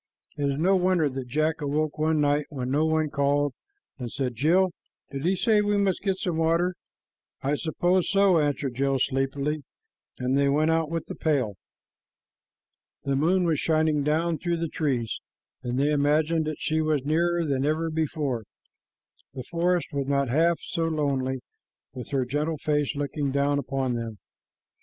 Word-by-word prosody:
It 145 - -1
is 140 - -1
no 185 +5 +3
wonder 180 -4 +2
that 130 -1 -5
Jack 155 +4 0
awoke 150 +1 -1
one 155 0 +2
night 145 0 +1
when 130 -4 -4
no 150 +3 +2
one 155 -1 +1
called 145 0 +1 0.5
and 120 -2 -5
said, 130 -3 -2
"Jill, 175 - +3 0.4
did 135 0 -5
he 185 +2 +3
say 215 +2 +3
we 205 0 +1
must 195 -2 +1
get 195 -2 0
some 180 -3 -2
water?" 165 +3 +2 0.7
"I 140 +2 +1
suppose 175 +4 +1
so," 195 -4 +4
answered 145 -3 -1
Jill 135 +2 +1
sleepily, 140 +3 -1 0.6
and 125 +1 0
they 140 0 +3
went 155 +3 +2
out 160 -1 +1
with 165 0 -3
the - - -6
pail. 135 -9 0 1.5
The 140 - 0
moon 175 +6 +2
was 160 -4 +1
shining 155 -2 +2
down 160 +3 0
through 175 -1 -1
the 165 -1 -2
trees, 130 -9 -1 0.4
and 125 0 -3
they 145 +2 +2
imagined 150 +2 +2
that 155 -1 -3
she 160 0 0
was 155 -3 0
nearer 170 +2 +1
than 135 -3 0
ever 160 +3 0
before. 150 -7 -2 0.9
The 130 - -5
forest 175 +1 +1
was 140 -1 -2
not 140 -2 +1
half 165 +6 +3
so 165 - -2
lonely 135 -5 -1 0.5
with 125 -2 -7
her 135 -3 0
gentle 150 +5 -1
face 150 0 0
looking 145 0 -2
down 140 +1 +1
upon 135 -1 -1
them. 115 -2 -4
150 Hz, 170 wpm, -26 LUFS, 140-165 Hz, 1.5 s, so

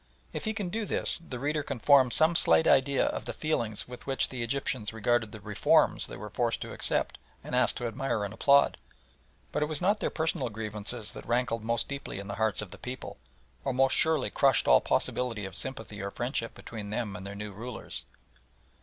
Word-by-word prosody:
If - - -4
he 220 - 0
can 200 -5 -2
do 215 +4 -2
this - - +1
the 165 -7 -7
reader 150 +4 0
can 140 -2 -4
form 130 +1 +6
some 160 +7 +3
slight 80 - +5
idea 135 +1 +4
of - - -2
the - - -4
feelings 115 -9 -1
with 125 +1 -10
which 135 -1 +1
the 130 -2 -5
Egyptians 120 -2 -2
regarded 115 0 +1
the 110 - -8
"reforms" 105 0 +3
they - - -8
were 105 +2 -8
forced 120 -1 0
to - - -5
accept - - 0 0.2
and - - -8
asked - - +2
to 120 - -3
admire 115 -2 -1
and 100 - -6
applaud. 140 +4 +4 0.7
But - - -1
it 150 - +2
was 155 -2 -2
not 205 +4 +2
their - - 0
personal 160 -6 -1
grievances 105 +1 -3
that - - -10
rankled 120 -2 0
most 115 +1 0
deeply 140 -7 -5
in 100 0 -6
the 100 - -5
hearts 110 -2 +2
of 95 - -10
the - - -11
people, 125 0 -7 0.4
or 135 - -1
most 135 +1 +4
surely 160 -4 +3
crushed 135 -3 +3
all - - +7
possibility 115 -5 0
of 95 - -7
sympathy 110 -6 -6
or 100 - -3
friendship 120 +1 -3
between 105 -3 -7
them 105 -2 -2
and 100 - -7
their 100 +1 -7
new 105 0 -5
rulers. 115 +5 -6
120 Hz, 210 wpm, -29 LUFS, 105-140 Hz, 0.7 s, all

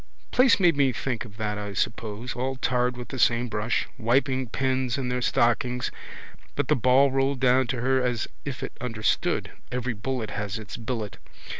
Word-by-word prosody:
Place 250 -4 +5
made 175 -4 +5
me 140 -2 +3
think 125 0 -3
of 105 -2 -13
that 105 -1 -2
I 105 -1 -5
suppose. 110 +3 -2
All 130 +2 -2
tarred 125 -1 0
with 125 - -7
the 130 - -5
same 120 +1 +3
brush. 105 +2 0
Wiping 130 +2 +2
pens 130 0 0
in 130 -2 -2
their 125 0 -1
stockings. 125 +1 +1 0.6
But - - -1
the - - +5
ball 130 +2 +4
rolled 135 0 +1
down 130 0 +4
to 125 -2 -2
her 130 +1 +2
as 125 -2 0 0.2
if 140 -3 -5
it - - -5
understood. 115 -4 0 0.2
Every 125 0 -1
bullet 115 +1 -3
has 100 0 -3
its 110 -2 -7
billet. 115 -3 -4
125 Hz, 180 wpm, -26 LUFS, 115-130 Hz, 0.6 s, Place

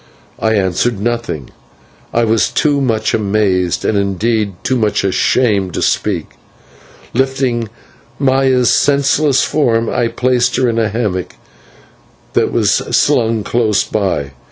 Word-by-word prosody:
I 110 -4 +1
said 115 +4 -1
nothing. 115 - -3 0.6
I 120 - +1
was 110 -4 +2
too 145 -2 +1
much 110 -4 0
amazed, 100 -4 0
and, 110 - +1
indeed, 100 +2 -1
too 130 - 0
much 105 -4 0
ashamed, 100 -1 +1
to - - -1
speak. - - -1 0.8
Lifting 130 -3 0 0.5
Maya's 130 -2 +2
senseless 140 0 +2
form, 115 -6 +1
I 120 - 0
placed 125 +1 0
her 130 - +1
in 115 -1 0
a 110 -2 +1
hammock 100 -5 -3 1.0
that - - +1
was - - +2
slung 115 -7 +1
close 110 -4 +1
by. 95 -10 -2
115 Hz, 125 wpm, -15 LUFS, 105-130 Hz, 1.0 s, was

